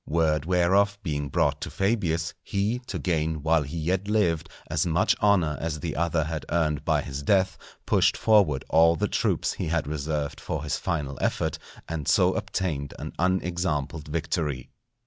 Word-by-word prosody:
Word 80 -2 +1
whereof 95 +3 +3
being 75 -4 -2
brought 75 -3 +1
to - - -4
Fabius, 95 -6 0
he, 105 +5 -1
to - - -3
gain, 80 -4 -1
while 80 0 +3
he 75 +4 -5
yet 90 +5 -1
lived, 85 -7 +1 0.2
as 75 - 0
much 85 -1 +2
honour 90 -9 +3
as 80 -2 -2
the - - -4
other 85 0 +1
had 80 0 -4
earned 75 -3 0
by 75 -2 +1
his 70 0 -5
death, 95 +5 +2 0.3
pushed - - +3
forward 100 -12 +3
all 85 +1 +5
the - - 0
troops - - 0
he - - -4
had 80 -2 0
reserved 75 0 -3
for 75 -2 -3
his 75 - -1
final 75 -7 -3
effort, - - -1 0.3
and 80 -4 -4
so - - +4
obtained 75 -7 -3
an - - -6
unexampled 85 -5 -1
victory. 75 -4 -2
80 Hz, 165 wpm, -26 LUFS, 75-90 Hz, 0.3 s, all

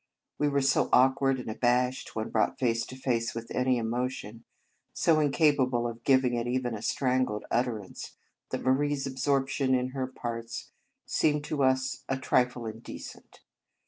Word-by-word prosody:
We 145 - +2
were 140 -1 +1
so 135 0 +2
awk 130 +2 +5
ward 135 -1 +3
and - - -7
abashed 125 +3 0
when 110 0 -3
brought - - +1
face 115 -2 0
to 130 - -9
face 115 -4 -1
with 115 0 -6
any 125 0 +2
emotion, 115 -1 -3 0.5
so 160 -2 +3
incapable 140 -5 +2
of 115 0 -7
giving 130 -2 +3
it 120 0 -1
even 125 -1 -1
a 105 - -5
strangled 125 -4 0
utterance, 115 -5 -2 0.3
that - - -3
Marie 145 +3 +2
s 135 -1 -4
absorption 135 0 +1
in 125 0 0
her 130 -1 -3
parts 115 -2 -6 0.3
seemed 150 -1 +1
to 150 -1 -2
us 130 0 +1
a 135 - 0
trifle 125 -2 +1
indecent. 110 +1 -9
130 Hz, 160 wpm, -29 LUFS, 120-135 Hz, 0.5 s, awk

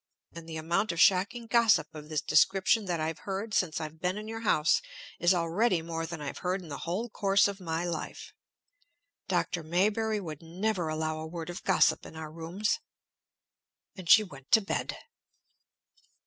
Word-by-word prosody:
"And 165 0 -10
the 160 - -5
amount 170 +7 0
of 170 - -5
shocking 200 +6 +3
gossip 225 -9 +3
of 150 -1 -10
this 155 -2 -1
description 190 +6 +3
that 175 -3 -1
I've 160 +1 -2
heard 200 +2 -4
since 165 -6 +1
I've 155 0 -7
been 180 +2 0
in 215 0 -6
your 225 0 -5
house 170 - +3 0.4
is 175 - +4
already 175 +2 +1
more 165 0 -4
than 170 -1 -6
I've 145 -1 -5
heard 185 +1 -1
in 165 - -11
the 140 - -5
whole 185 +8 -2
course 200 -3 +3
of 200 0 -5
my 165 -1 -2
life! 170 -3 -5 0.9
Dr. 175 -1 0
Maybury 210 +7 +1
would 155 -6 -7
never 180 +2 -2
allow 155 0 -2
a 160 - -5
word 165 +1 -6
of 175 - -7
gossip 190 - +3
in - - -12
our 160 -1 -7
rooms." 170 +7 -2 1.2
And 185 -5 -9
she 215 - +9
went 135 -9 -13
to 220 - +8
bed. 195 - -3
175 Hz, 175 wpm, -29 LUFS, 160-200 Hz, 1.2 s, she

